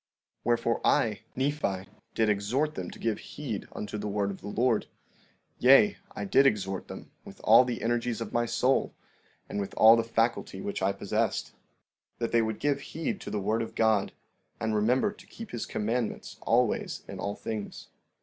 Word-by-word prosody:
15:25 - - -53
Wherefore, 115 0 +1
I, 110 -3 +2 0.2
Nephi, 130 -9 -1 0.3
did 110 - +2
exhort 110 +9 +1
them - - -5
to - - -11
give 115 -2 -1
heed - - -6
unto 105 0 -5
the 105 - -3
word 100 -1 0
of 95 - -9
the - - -8
Lord; 115 +2 +1 0.7
yea, 135 +11 +6 0.2
I - - -3
did 140 -9 +5
exhort 95 -5 -1
them - - -9
with - - -12
all - - +8
the 125 -2 -4
energies 120 0 0
of 115 -2 -5
my 120 0 +1
soul, 130 +3 +1 0.5
and - - -4
with 100 - -4
all 110 +1 +9
the 115 - +1
faculty 115 -3 -1
which 100 0 -4
I 95 +1 +2
possessed, - - -1 0.6
that 115 - -2
they 115 - +4
would 110 -1 -2
give 145 -1 0
heed 165 - -4
to - - -6
the 105 - -2
word 110 +3 0
of 115 - -5
God 110 -3 +2 0.5
and 110 0 -1
remember 120 - +2
to 210 - -16
keep 230 -1 -10
his 120 - -4
commandments 115 +2 -2
always - - +1
in - - -7
all 100 +1 -3
things. 110 -2 -6
115 Hz, 185 wpm, -29 LUFS, 105-125 Hz, 0.7 s, all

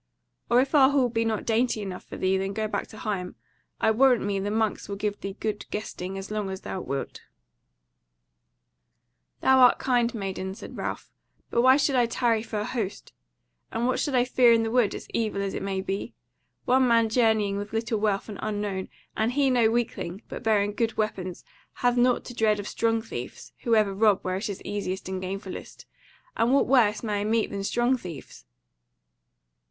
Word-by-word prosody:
Or 240 - +5
if 265 +3 +1
our 270 -3 +7
hall 270 -3 +2
be 230 -1 0
not 220 -2 -1
dainty 230 0 +1
enough 190 -3 -6
for - - -9
thee, 190 0 +1
then 195 +1 -1
go 215 +1 -1
back - - -3
to 215 - -13
Higham: 195 -5 -3 0.4
I - - +3
warrant 250 0 +4
me 200 -1 -1
the 200 +1 -2
monks 220 -1 -1
will 200 - -3
give 205 0 -3
thee 195 +1 -6
good 215 -1 -3
guesting 195 -3 -5
as 195 +2 -7
long 210 -2 -2
as 190 0 -5
thou 190 - -5
wilt." 135 -2 -4 2.2
"Thou 265 0 +5
art 250 -1 +7
kind, 245 -2 +1
maiden," 190 -2 -4
said 230 - -10
Ralph, - - -5 0.4
"but 235 - +3
why 260 +2 +6
should 280 -1 +1
I 245 -2 +4
tarry 230 -1 +1
for 215 -2 -4
an - - -3
host? 220 -5 -4 0.6
and 235 - -1
what 255 - +1
should 285 -4 -1
I 245 - +5
fear 250 -1 +5
in 230 -1 +4
the 225 - -2
Wood, 235 -4 +2
as - - -8
evil 220 -3 -1
as 195 -1 -2
it - - -4
may 195 -1 -2
be? 195 +1 -4 0.5
One 260 0 +4
man 230 -1 +4
journeying 220 -3 +2
with 205 +1 -5
little 225 0 -1
wealth, 205 -2 0
and 210 -3 -8
unknown, 205 -3 -3 0.3
and 220 +3 0
he 275 -1 +3
no 235 -3 +4
weakling, 225 -4 -2
but - - -7
bearing 210 -3 +2
good 225 +1 -1
weapons, 190 -4 -3 0.3
hath 245 -1 +1
nought 245 0 +2
to 245 - -8
dread 215 -3 +2
of 205 - -5
strong 225 -1 0
thieves, 125 - -8
who 230 -2 +4
ever 210 -2 +3
rob 205 0 +3
where 185 0 -1
it 205 +2 -3
is 200 - -6
easiest 195 -2 -3
and 190 0 -4
gainfullest. 190 +1 -7 0.5
And 230 +2 +2
what 280 - +4
worse 230 -5 +3
may 210 -2 -1
I - - -1
meet 220 +1 +1
than 200 -1 -4
strong 240 +5 +2
thieves?" 165 - -10
215 Hz, 200 wpm, -26 LUFS, 195-235 Hz, 2.2 s, our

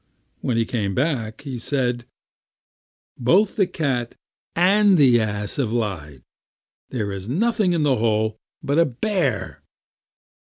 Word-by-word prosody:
When 120 - -1
he 115 - +2
came 105 -5 -2
back, 125 -6 -1
he 135 -4 -6
said: 125 -2 -1 1.1
"Both 190 - +3
the 195 -6 +2
cat 135 -9 -2 0.4
and 195 +2 +4
the 130 -5 +5
ass 105 -1 -2
have 125 -6 0
lied; 85 - -3 0.7
there 120 -5 -2
was 100 +1 -6
nothing 210 - +1
in 165 -3 +1
the 135 -4 +2
hole 110 -1 0 0.2
but 140 +3 +1
a 170 - +5
bear." 140 - -2
125 Hz, 130 wpm, -22 LUFS, 110-165 Hz, 1.1 s, the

